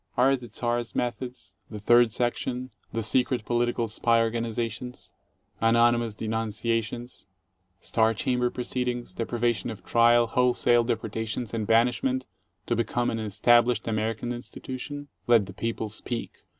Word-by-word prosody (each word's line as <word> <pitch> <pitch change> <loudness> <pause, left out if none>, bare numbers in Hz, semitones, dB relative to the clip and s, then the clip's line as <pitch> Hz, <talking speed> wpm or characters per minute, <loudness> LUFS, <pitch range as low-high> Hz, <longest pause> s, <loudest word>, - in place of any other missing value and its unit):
Are 135 +2 +5
the 125 -3 -9
Czar's 120 +1 -2
methods, 125 -3 -4 0.2
the 105 - -7
Third 120 +2 +5
Section, 125 +2 -2 0.2
the 115 0 -2
secret 125 +1 +1
political 120 -1 0
spy 115 +2 +2
organizations, 115 +1 -3 0.5
anonymous 115 -1 +3
denunciations, 115 +1 -3 0.5
star 110 0 +2
chamber 125 +2 0
proceed 125 +1 -2
ings, 120 -5 -3
deprivation 120 0 -1
of 110 -2 -8
trial, 120 0 +5
wholesale 120 0 +3
deportations 110 0 -3
and 110 -2 -2
banishment, 125 +3 +2 0.4
to 120 - 0
become 120 +1 0
an 115 - -2
established 115 +2 +3
American 110 +2 -1
institution? 130 +4 -7 0.2
Let 115 -4 +5
the 95 - -10
people 115 +2 -3
speak. 115 +2 -6
120 Hz, 125 wpm, -27 LUFS, 110-120 Hz, 0.5 s, Are